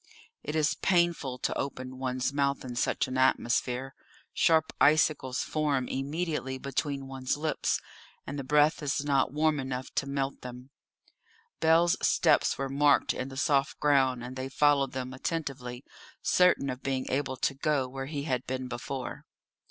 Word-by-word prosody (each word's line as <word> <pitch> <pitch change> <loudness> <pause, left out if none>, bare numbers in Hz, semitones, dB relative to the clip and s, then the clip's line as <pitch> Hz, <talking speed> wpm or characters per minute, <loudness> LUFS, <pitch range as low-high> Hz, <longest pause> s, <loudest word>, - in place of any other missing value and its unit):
It 150 - -5
is 155 -1 +2
painful 170 -8 +1
to - - -2
open 130 -1 -5
one's 130 0 -1
mouth 140 -1 0
in 125 -1 -6
such 120 - 0
an 130 0 -2
atmosphere; 130 +1 +1 0.4
sharp 160 -1 +3
icicles 150 -3 +3
form 145 -5 0
immediately 145 -1 -3
between 140 +1 -3
one's 135 0 -3
lips, 155 0 0 0.5
and 145 - -5
the - - -3
breath 150 +4 +3
is 145 0 -1
not 140 -3 +2
warm 150 +1 +1
enough 130 -1 -5
to 140 - -1
melt 140 0 -2
them. 125 +1 -9 0.9
Bell's 165 +2 +4
steps - - +3
were 135 - -2
marked 140 +1 +3
in 130 - -4
the 135 - -9
soft 140 0 +1
ground, 130 -4 +2
and 125 +1 -7
they 130 +1 -4
followed 140 -1 +2
them 130 0 -4
attentively, 130 -4 -4 0.4
certain 180 -7 +3
of 125 +1 -7
being 135 -1 -2
able 135 -1 -1
to 140 - 0
go 140 -1 0
where 135 +1 -6
he 145 -1 -4
had 130 -4 -2
been 130 0 -3
before. 125 +2 -6
135 Hz, 160 wpm, -29 LUFS, 130-150 Hz, 0.9 s, Bell's